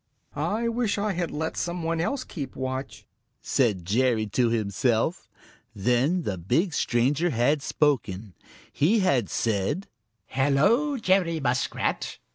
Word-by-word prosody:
"I 225 Hz, +3 st, -1 dB
wish 230 Hz, -3 st, 0 dB
I 205 Hz, 0 st, 0 dB
had 175 Hz, -2 st, -2 dB
let 160 Hz, +2 st, -3 dB
some 175 Hz, 0 st, -3 dB
one 165 Hz, 0 st, 0 dB
else 255 Hz, +9 st, -1 dB
keep 140 Hz, -6 st, -7 dB
watch," 130 Hz, +1 st, -5 dB, 0.3 s
said 105 Hz, -10 st, 0 dB
Jerry 115 Hz, +2 st, +2 dB
to 120 Hz, +3 st, +2 dB
himself. 115 Hz, -, 0 dB, 0.5 s
Then 125 Hz, -, +1 dB
the 95 Hz, -, -3 dB
big 140 Hz, -, 0 dB
stranger 135 Hz, +7 st, +1 dB
had 140 Hz, +3 st, +2 dB
spoken. 115 Hz, -, 0 dB, 0.4 s
He 205 Hz, +9 st, +3 dB
had 135 Hz, -, +2 dB
said: 110 Hz, -, -1 dB, 0.4 s
"Hello, 155 Hz, -, +2 dB
Jerry 185 Hz, -6 st, +2 dB
Muskrat! 125 Hz, -3 st, -1 dB
140 Hz, 125 wpm, -26 LUFS, 120-180 Hz, 0.5 s, He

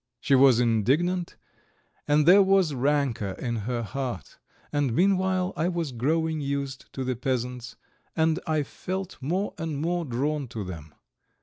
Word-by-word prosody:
She 140 Hz, -, 0 dB
was 130 Hz, -3 st, +6 dB
indignant, 140 Hz, -, +1 dB, 0.7 s
and 150 Hz, 0 st, +3 dB
there 190 Hz, +4 st, +8 dB
was 190 Hz, -5 st, +3 dB
rancour 135 Hz, -7 st, 0 dB
in 120 Hz, +1 st, -3 dB
her 120 Hz, +2 st, -2 dB
heart, 120 Hz, -, -5 dB, 0.3 s
and 140 Hz, -5 st, +1 dB
meanwhile 185 Hz, 0 st, +2 dB
I 165 Hz, -, 0 dB
was 170 Hz, -5 st, -2 dB
growing 155 Hz, +6 st, 0 dB
used 140 Hz, -1 st, -4 dB
to 135 Hz, -, -3 dB
the 130 Hz, 0 st, -1 dB
peasants, 125 Hz, 0 st, -3 dB, 0.4 s
and 160 Hz, 0 st, +2 dB
I 155 Hz, -2 st, +1 dB
felt 185 Hz, +6 st, -6 dB
more 180 Hz, +9 st, -1 dB
and 160 Hz, -3 st, -3 dB
more 175 Hz, +3 st, -1 dB
drawn 140 Hz, +3 st, -1 dB
to 110 Hz, -2 st, -5 dB
them. 80 Hz, -5 st, -9 dB
140 Hz, 145 wpm, -26 LUFS, 125-170 Hz, 0.7 s, there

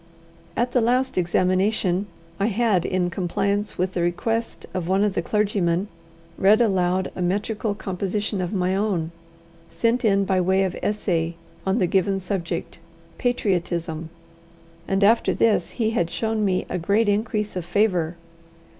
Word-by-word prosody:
At 240 Hz, +1 st, +1 dB
the 250 Hz, -, +3 dB
last 250 Hz, +3 st, +1 dB
examination 185 Hz, +2 st, +1 dB, 0.3 s
I 200 Hz, -, +2 dB
had, 215 Hz, -5 st, +1 dB
in 180 Hz, -1 st, 0 dB
compliance 200 Hz, +3 st, -1 dB
with 185 Hz, +1 st, -1 dB
the 175 Hz, -, -1 dB
request 225 Hz, +7 st, -1 dB
of 180 Hz, -3 st, -3 dB
one 190 Hz, +2 st, +2 dB
of 210 Hz, -2 st, +1 dB
the -, -, 0 dB
clergymen, 200 Hz, -2 st, 0 dB, 0.5 s
read 205 Hz, +3 st, +5 dB
aloud 185 Hz, -4 st, +1 dB
a -, -, -4 dB
metrical 205 Hz, +3 st, -1 dB
composition 195 Hz, +1 st, -2 dB
of 180 Hz, -, -2 dB
my 185 Hz, -2 st, 0 dB
own, 190 Hz, -6 st, 0 dB, 0.6 s
sent 235 Hz, +1 st, 0 dB
in 200 Hz, -3 st, +3 dB
by 190 Hz, -1 st, +2 dB
way 190 Hz, +2 st, +2 dB
of 185 Hz, -2 st, -2 dB
essay 170 Hz, -5 st, -1 dB, 0.3 s
on 190 Hz, +3 st, +2 dB
the 195 Hz, -, +3 dB
given 195 Hz, +2 st, +1 dB
subject, 180 Hz, -3 st, -4 dB, 0.4 s
Patriotism, 175 Hz, -8 st, -1 dB, 0.8 s
and 195 Hz, +1 st, +1 dB
after 225 Hz, +3 st, +4 dB
this 215 Hz, -6 st, +2 dB
he 225 Hz, -2 st, +1 dB
had 175 Hz, -8 st, 0 dB
shown 220 Hz, +1 st, -1 dB
me 185 Hz, -2 st, +1 dB
a 180 Hz, -, -3 dB
great 205 Hz, +6 st, +2 dB
increase 210 Hz, 0 st, 0 dB
of 180 Hz, -, -2 dB
favour. 180 Hz, -3 st, +1 dB
195 Hz, 150 wpm, -23 LUFS, 180-215 Hz, 0.8 s, read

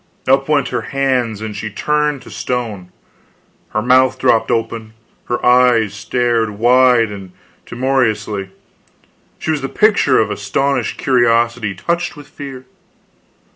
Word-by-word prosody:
Up 135 Hz, +2 st, +2 dB
went 145 Hz, -2 st, +2 dB
her -, -, -2 dB, 0.2 s
hands, 125 Hz, -6 st, 0 dB
and 110 Hz, -1 st, -5 dB
she 110 Hz, -, -5 dB
was 105 Hz, -, -11 dB
turned 150 Hz, -2 st, 0 dB
to -, -, -13 dB
stone; 110 Hz, -8 st, -4 dB, 0.8 s
her 110 Hz, -, -2 dB
mouth 130 Hz, +1 st, +3 dB
dropped 125 Hz, -4 st, +2 dB
open, 115 Hz, -2 st, -2 dB, 0.3 s
her 120 Hz, -, -3 dB
eyes 125 Hz, -4 st, +4 dB
stared 115 Hz, +1 st, 0 dB
wide 120 Hz, -1 st, +4 dB
and 95 Hz, -3 st, -9 dB, 0.3 s
timorously, 110 Hz, -6 st, -1 dB, 0.9 s
she 160 Hz, -, -2 dB
was 150 Hz, -3 st, -1 dB
the 135 Hz, -, -4 dB
picture 210 Hz, -11 st, +3 dB
of 110 Hz, -1 st, +1 dB
astonished 135 Hz, +8 st, -1 dB
curiosity 120 Hz, -4 st, +1 dB
touched 170 Hz, -, -2 dB
with 145 Hz, -, -12 dB
fear. 135 Hz, -2 st, -9 dB
125 Hz, 135 wpm, -17 LUFS, 110-135 Hz, 0.9 s, eyes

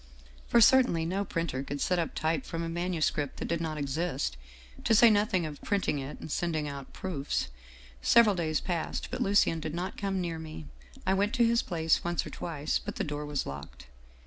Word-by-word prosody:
" -, -, -23 dB
For 235 Hz, -, +5 dB
certainly 235 Hz, -9 st, +5 dB
no 190 Hz, +4 st, -1 dB
printer 165 Hz, -8 st, -2 dB
could 140 Hz, +1 st, -5 dB
set 180 Hz, +5 st, +1 dB
up 165 Hz, -, -2 dB
type 155 Hz, -3 st, 0 dB
from 165 Hz, 0 st, -4 dB
a 165 Hz, -, -3 dB
manu 175 Hz, 0 st, -2 dB
script 145 Hz, -2 st, 0 dB
that -, -, -4 dB
did 170 Hz, -1 st, -1 dB
not 155 Hz, -2 st, -3 dB
exist, 145 Hz, -, -2 dB, 0.5 s
to 225 Hz, -, +4 dB
say 230 Hz, +1 st, +8 dB
nothing 205 Hz, -4 st, +2 dB
of 150 Hz, -2 st, -7 dB
printing 195 Hz, -7 st, 0 dB
it 135 Hz, +2 st, -6 dB
and 155 Hz, -, -8 dB
sending 160 Hz, -3 st, -1 dB
out 140 Hz, -2 st, -7 dB
proofs. 145 Hz, -, -3 dB, 0.3 s
" -, -, -21 dB
Several 220 Hz, -, +6 dB
days 160 Hz, -4 st, 0 dB
passed, 170 Hz, -3 st, -3 dB
but -, -, -3 dB
Lucien 195 Hz, -4 st, +3 dB
did 155 Hz, 0 st, -4 dB
not 180 Hz, +2 st, -4 dB
come 195 Hz, -2 st, -1 dB
near 170 Hz, -2 st, -3 dB
me. 155 Hz, -, -8 dB, 0.4 s
I 190 Hz, -, +3 dB
went 205 Hz, +4 st, +1 dB
to 240 Hz, -2 st, +4 dB
his 235 Hz, +1 st, +3 dB
place 165 Hz, -3 st, +1 dB
once 175 Hz, 0 st, -1 dB
or -, -, -7 dB
twice, 155 Hz, -3 st, -2 dB
but -, -, -6 dB
the -, -, -1 dB
door 150 Hz, 0 st, -4 dB
was 145 Hz, -2 st, -2 dB
locked. 70 Hz, -2 st, -8 dB
165 Hz, 215 wpm, -30 LUFS, 145-185 Hz, 0.5 s, say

